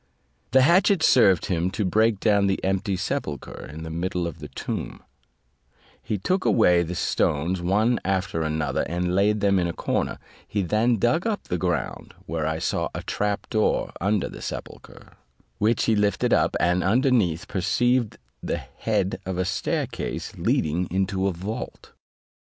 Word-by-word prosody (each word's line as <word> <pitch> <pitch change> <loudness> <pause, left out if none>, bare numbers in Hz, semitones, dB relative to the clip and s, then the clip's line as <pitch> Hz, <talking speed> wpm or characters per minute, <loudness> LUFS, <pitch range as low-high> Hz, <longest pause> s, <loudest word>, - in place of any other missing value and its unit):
The 130 +2 +5
hatchet 180 +3 +4
served 95 - +5
him 90 -1 0
to 100 +2 -2
break 110 +2 +2
down 100 -2 +3
the 95 - 0
empty 95 +1 0
sepulchre 95 - -4
in 80 +1 -8
the 80 - -6
middle 90 +1 -2
of 85 - -6
the - - -7
tomb; - - -5 1.0
he 105 - -2
took 185 - 0
away 90 -6 +4
the 85 +1 -3
stones 85 +3 0
one 105 +7 +2
after 95 -3 -1
another, 80 -1 -1
and 90 +1 -1
laid 105 +2 +2
them 100 -2 +3
in 85 - +1
a 85 - -3
corner; - - -2 0.3
he 100 -2 -1
then 110 +6 +2
dug 120 - +1
up 215 -2 -2
the 90 - -2
ground, 90 0 -3
where 80 -1 -2
I 80 0 -1
saw - - -1
a - - -4
trap 105 0 -2
door 110 -1 +1
under 100 +2 +1
the - - -10
sepulchre, - - -9 0.4
which 110 +2 +2
he 110 - +3
lifted 105 -2 +1
up, - - +2
and 90 +1 +2
underneath 105 - +2
perceived 120 +5 +1 0.2
the - - -2
head 100 -4 -2
of 95 -1 -4
a 90 - 0
staircase 95 +1 -3
leading 85 +4 0
into 95 +1 0
a - - +1
vault. 95 +6 -6
95 Hz, 165 wpm, -24 LUFS, 90-110 Hz, 1.0 s, The